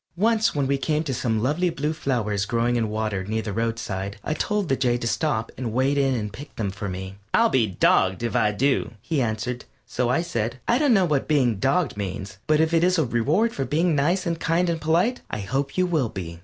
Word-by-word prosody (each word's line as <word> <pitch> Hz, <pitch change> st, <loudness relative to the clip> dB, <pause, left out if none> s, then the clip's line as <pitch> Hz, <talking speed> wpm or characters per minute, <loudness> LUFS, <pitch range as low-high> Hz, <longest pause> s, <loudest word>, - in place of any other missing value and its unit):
Once 220 Hz, +1 st, +2 dB
when 140 Hz, -2 st, +1 dB
we 140 Hz, +1 st, 0 dB
came 155 Hz, +2 st, 0 dB
to 140 Hz, -4 st, -3 dB
some 110 Hz, -3 st, -1 dB
lovely 160 Hz, +7 st, +1 dB
blue 150 Hz, -1 st, -2 dB
flowers 110 Hz, -9 st, -1 dB
growing 120 Hz, +2 st, 0 dB
in 115 Hz, -2 st, 0 dB
water 105 Hz, -3 st, -2 dB
near 110 Hz, +2 st, -2 dB
the 105 Hz, -, -4 dB
roadside 105 Hz, -3 st, -3 dB
I -, -, -1 dB
told 210 Hz, +3 st, -1 dB
the 135 Hz, -, +2 dB
Jay 125 Hz, -2 st, +1 dB
to 120 Hz, -, -5 dB
stop 115 Hz, -2 st, -1 dB
and 120 Hz, -4 st, -3 dB
wade 130 Hz, +3 st, +2 dB
in 135 Hz, -2 st, +2 dB
and 105 Hz, -3 st, -4 dB
pick 145 Hz, +4 st, -10 dB
them 100 Hz, -3 st, -2 dB
for 100 Hz, +1 st, -5 dB
me. 95 Hz, +1 st, -6 dB, 0.2 s
"I'll 230 Hz, 0 st, +5 dB
be 120 Hz, -, +2 dB
dogged 95 Hz, +1 st, +2 dB
if 115 Hz, -, -2 dB
I 105 Hz, -, +3 dB
do," 115 Hz, 0 st, 0 dB
he 145 Hz, +5 st, -1 dB
answered; 120 Hz, +2 st, -2 dB, 0.2 s
so 125 Hz, -1 st, -1 dB
I 130 Hz, +7 st, +2 dB
said: 120 Hz, -6 st, -3 dB
"I 240 Hz, -, +3 dB
don't 285 Hz, -6 st, +4 dB
know 190 Hz, -2 st, +4 dB
what 150 Hz, -5 st, 0 dB
being 130 Hz, -8 st, +2 dB
'dogged' 135 Hz, -, +1 dB
means, 95 Hz, -1 st, -5 dB
but 155 Hz, 0 st, +3 dB
if 160 Hz, +1 st, +2 dB
it 165 Hz, 0 st, +3 dB
is 180 Hz, +1 st, +3 dB
a 160 Hz, -, +2 dB
reward 145 Hz, -, +1 dB
for 135 Hz, -, -2 dB
being 160 Hz, +4 st, +1 dB
nice 175 Hz, +7 st, +1 dB
and 170 Hz, -2 st, -1 dB
kind 170 Hz, +2 st, +1 dB
and 165 Hz, -1 st, -3 dB
polite, 170 Hz, +11 st, +1 dB
I 105 Hz, -, -3 dB
hope 135 Hz, -, -2 dB
you 185 Hz, -, +3 dB
will 155 Hz, -9 st, 0 dB
be." 85 Hz, -4 st, -7 dB
130 Hz, 235 wpm, -24 LUFS, 110-160 Hz, 0.2 s, I'll